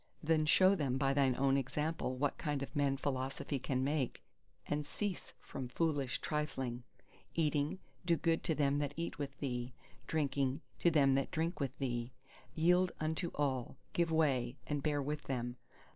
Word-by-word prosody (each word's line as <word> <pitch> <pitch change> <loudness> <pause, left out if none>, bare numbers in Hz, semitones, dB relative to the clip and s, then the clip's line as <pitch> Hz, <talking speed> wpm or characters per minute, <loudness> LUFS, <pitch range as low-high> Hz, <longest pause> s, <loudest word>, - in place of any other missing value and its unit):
then 155 0 +3
show 185 +5 +6
them 140 -8 0
by 135 0 +2
thine 135 -3 +3
own 135 +1 +3
example 140 0 -1
what 140 +2 0
kind 145 -2 -1
of 140 - -8
men 140 -1 +2
philosophy 135 0 -2
can 130 0 0
make, 140 -2 -1 0.4
and 145 0 -2
cease 205 +1 -3
from 130 - -6
foolish 140 -1 0
trifling. 135 -5 -2 0.5
Eating, 150 0 +1 0.3
do 170 -1 +3
good 165 +2 +1
to 160 - +1
them 140 0 +2
that 145 0 -2
eat 170 -2 -3
with 140 -1 -4
thee; 125 -2 -3 0.3
drinking, 140 -3 +1 0.2
to 170 - +5
them 140 -4 +5
that 135 0 +1
drink 165 +2 -1
with 135 -2 -2
thee; 120 -2 -2 0.4
yield 180 +3 +4
unto 160 +3 -1
all, 135 -4 -1 0.2
give 170 -1 +2
way, 135 -6 +2
and 145 -1 -1
bear 145 -1 +1
with 150 +1 -3
them. 120 -2 -2
145 Hz, 165 wpm, -35 LUFS, 135-155 Hz, 0.5 s, show